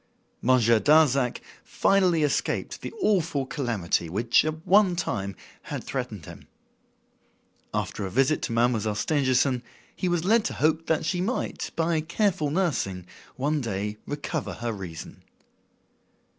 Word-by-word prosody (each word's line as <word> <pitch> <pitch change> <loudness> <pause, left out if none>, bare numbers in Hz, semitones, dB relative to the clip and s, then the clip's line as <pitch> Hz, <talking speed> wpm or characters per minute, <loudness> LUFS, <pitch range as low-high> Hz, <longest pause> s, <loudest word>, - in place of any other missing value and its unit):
Monsieur 115 -2 +4
Darzac 140 0 +3 0.2
finally 180 -5 +2
escaped 145 - -1
the - - -5
awful 165 -9 +1
calamity 115 - -1
which, 110 +7 +3
at 155 +1 -4
one 195 -2 +5
time, 100 - -3 0.3
had - - -6
threatened - - -5
him. - - -12 1.2
After 105 - -3
a 95 - -3
visit 135 +9 +2
to - - -3
Mademoiselle 115 -2 +1
Stangerson, 130 0 +1 0.3
he 185 - -1
was 175 -1 0
led 220 +3 +4
to - - -2
hope 160 +1 +1
that 160 0 +1
she 180 +1 0
might, 230 +8 -2
by 165 -1 +1
careful 160 -1 0
nursing, 140 - -1 0.3
one 145 +3 0
day 105 -2 -3
recover 145 0 -3
her 120 -1 -3
reason. 90 -5 -8
145 Hz, 130 wpm, -26 LUFS, 115-165 Hz, 1.2 s, one